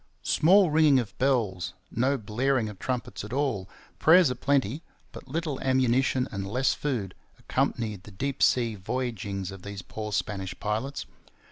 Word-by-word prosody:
Small 185 +1 +5
ringing 155 -3 +5
of 115 -6 -2
bells, 100 -9 0 0.2
no 130 +4 +1
blaring 120 +2 0
of 100 -3 -10
trumpets 125 -2 -3
at 105 - -8
all, 125 -9 -1 0.3
prayers 165 -3 +6
a - - -2
plenty, 140 +1 +1 0.3
but - - -11
little 155 0 -3
ammunition 130 0 +2
and 100 -2 -4
less 125 +6 +1
food, 115 -10 -3 0.2
accompanied 105 -5 -1
the 100 - -13
deep 135 +7 -3
sea 120 -3 +3
voyagings 100 -3 -3
of 95 -1 -10
these 100 0 -7
poor 105 -1 -6
Spanish 95 -3 -3
pilots. 110 +7 -2
120 Hz, 150 wpm, -27 LUFS, 100-135 Hz, 0.3 s, prayers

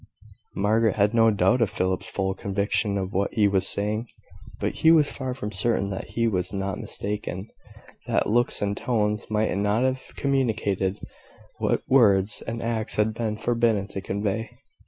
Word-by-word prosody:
Margaret 110 +2 +2
had 105 +1 +2
no 115 -1 +5
doubt 115 +4 +2
of 110 - +3
Philip's 95 0 -1
full 95 -1 -1
conviction 100 +1 -1
of 95 0 -3
what 100 +2 0
he 105 -3 +4
was 95 -1 +2
saying; 105 +3 -1 0.5
but - - -2
she 160 - +4
was 160 -3 +5
far 130 -2 -4
from 105 -5 -5
certain 100 0 +1
that 95 - -4
he 115 0 +3
was 90 -4 -1
not 95 -1 -3
mistaken 105 -1 -5 0.6
that - - +1
looks 120 0 +1
and 100 0 0
tones 105 -3 -1
might 110 -2 0
not 105 +4 +1
have 130 0 0
communicated 110 -8 0 0.6
what - - 0
words 105 -6 +4
and 115 +1 -4
acts 115 -1 -1
had 105 +1 +1
been 110 -1 -2
forbidden 115 -3 +1
to 100 - -5
convey. 100 +3 -2
105 Hz, 165 wpm, -25 LUFS, 100-115 Hz, 0.6 s, no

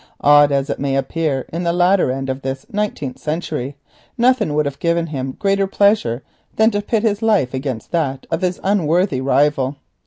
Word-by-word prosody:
Odd 145 0 +6
as 140 0 +1
it - - -4
may 135 -1 -1
appear 135 0 -1
in 170 - -2
the 170 -1 +1
latter 180 -1 +3
end 135 +1 -3
of 130 +1 -3
this 135 0 -4
nineteenth 200 -11 -3
century, 150 -4 -3 0.4
nothing 235 -10 +2
would 150 0 +2
have 140 -1 -4
given 170 0 +1
him 135 -4 -5
greater 195 -1 +1
pleasure 195 - +2 0.3
than 220 +1 +4
to 205 -1 -1
put 215 +1 -1
his 210 -2 0
life 210 - +2
against 130 -4 -4
that 140 -6 -1
of 165 - -1
his 180 -1 -1
unworthy 180 -6 +1
rival. 140 0 +1
150 Hz, 185 wpm, -19 LUFS, 135-195 Hz, 0.4 s, Odd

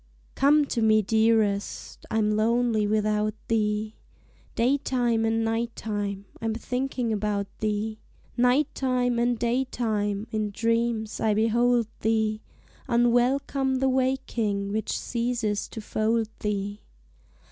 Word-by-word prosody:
Come 290 +2 +4
to 240 -4 -2
me, 215 -1 +4
dearest, 220 -1 0
I'm 215 -1 +1
lonely 220 0 +2
without 215 0 +1
thee, 215 -1 0 0.6
Daytime 245 -2 +1
and 225 0 +1
night 230 +1 -1
time, 205 -2 -3 0.2
I'm 225 -1 -1
thinking 250 0 -2
about 205 -1 -1
thee; 215 0 -2 0.4
Night 250 +4 +2
time 250 -2 0
and 240 0 +1
daytime, 225 -4 -1
in 215 -1 -1
dreams 230 0 -1
I 215 -1 +2
behold 235 +2 +3
thee; 220 -1 0 0.5
Unwelcome 255 +3 +2
the 265 +1 +2
waking 240 -6 0
which 215 0 -1
ceases 235 -3 -2
to - - -8
fold 220 +1 0
thee. 205 0 -3
225 Hz, 115 wpm, -26 LUFS, 215-245 Hz, 0.6 s, Come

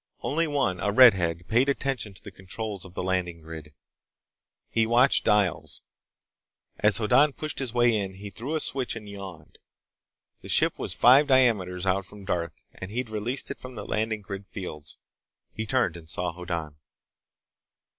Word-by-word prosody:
Only 165 +3 0
one, 135 - 0
a 100 - 0
redhead, 90 -8 +5
paid 125 +5 +3
attention 130 -7 -2
to - - -17
the - - -9
controls 100 +1 -7
of 95 -1 -14
the - - -3
landing 90 -3 -2
grid. 80 -2 -10 1.0
He 115 -1 +1
watched 125 +4 +4
dials. 105 -4 +1 1.0
As 105 -1 +4
Hoddan 135 +7 +4
pushed 155 +1 -4
his 130 -4 -2
way 120 -1 +3
in, 95 -2 -3
he 100 +1 -9
threw 125 +11 -5
a - - +1
switch 130 -5 0
and 110 -2 -8
yawned. 95 -6 -10 0.8
The - - -11
ship - - +2
was - - -2
five 135 +5 +6
diameters 105 -9 +2
out 95 0 0
from 100 +1 -13
Darth, 85 -4 -3
and 95 - -8
he'd 115 +1 -4
released 115 +5 -2
it - - -7
from 130 -1 -10
the 105 - -7
landing 110 0 -1
grid 100 0 -8
fields. 80 -7 -7 0.6
He 110 0 -5
turned 120 -8 +1
and 80 -2 -12
saw 90 +2 -3
Hoddan. 85 -4 -5
105 Hz, 165 wpm, -26 LUFS, 90-120 Hz, 1.0 s, five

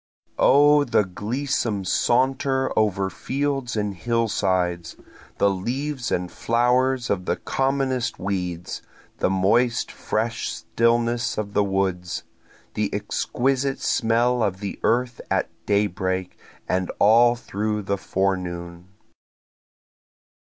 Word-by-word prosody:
O 145 +1 +6
the 120 -5 +2
gleesome 105 +1 -2
saunter 130 +5 +1
over 100 -3 +1
fields 135 +2 -2
and 105 -1 -1
hillsides! 95 -5 0 0.4
The 100 - +3
leaves 125 +7 -3
and 90 0 -1
flowers 125 +1 +1
of 90 -3 -1
the - - +1
commonest 135 -2 -1
weeds, 90 -3 -3 0.4
the - - +2
moist 110 +6 +2
fresh 115 +1 -2
stillness 120 +1 0
of 105 -1 -3
the 105 - +3
woods, 95 -3 -1 0.5
The - - -1
exquisite 135 +1 -1
smell 120 +2 +2
of 95 -4 0
the 100 -1 -5
earth 120 +1 +1
at - - 0 0.2
daybreak, 95 -2 0 0.3
and 90 0 0
all 120 +3 +6
through 105 -2 -3
the 100 0 -1
forenoon. 90 -3 -2
110 Hz, 105 wpm, -23 LUFS, 95-125 Hz, 0.5 s, O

